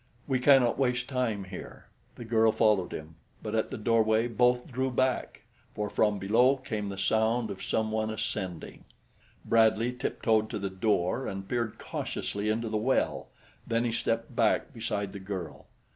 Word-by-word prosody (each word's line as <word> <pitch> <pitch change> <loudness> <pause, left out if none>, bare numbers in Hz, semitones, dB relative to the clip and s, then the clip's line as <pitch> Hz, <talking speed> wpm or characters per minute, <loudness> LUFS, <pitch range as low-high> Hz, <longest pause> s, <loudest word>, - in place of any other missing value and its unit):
"We 130 -3 +1
cannot 130 -2 +5
waste 125 -1 +1
time 125 -7 -1
here." 95 -1 -9 0.3
The 120 - -8
girl 110 -1 +3
followed 105 -4 +2
him; 80 +1 -8 0.3
but 105 - -4
at 110 -1 0
the - - -5
doorway 110 +1 +2
both 125 +1 +2
drew 130 +2 0
back, 130 0 -1 0.3
for 105 -1 -3
from 105 -1 +2
below 120 +8 +3
came 110 -6 -4
the 100 - -6
sound 110 +3 +1
of 95 - -7
some 110 -1 -1
one 110 0 -1
ascending. 105 -5 -4 0.6
Bradley 115 +1 +3
tiptoed 110 -3 0
to - - -3
the 100 -1 -3
door 95 +4 0
and 95 0 -5
peered 115 -2 -2
cautiously 105 +1 -3
into 115 +2 0
the 110 0 -1
well; 125 +5 0 0.4
then 115 0 +1
he 120 - 0
stepped 115 +1 -2
back 115 +6 +2
beside 105 -4 -3
the 100 - -6
girl. 95 -4 -6
110 Hz, 165 wpm, -29 LUFS, 105-120 Hz, 0.6 s, cannot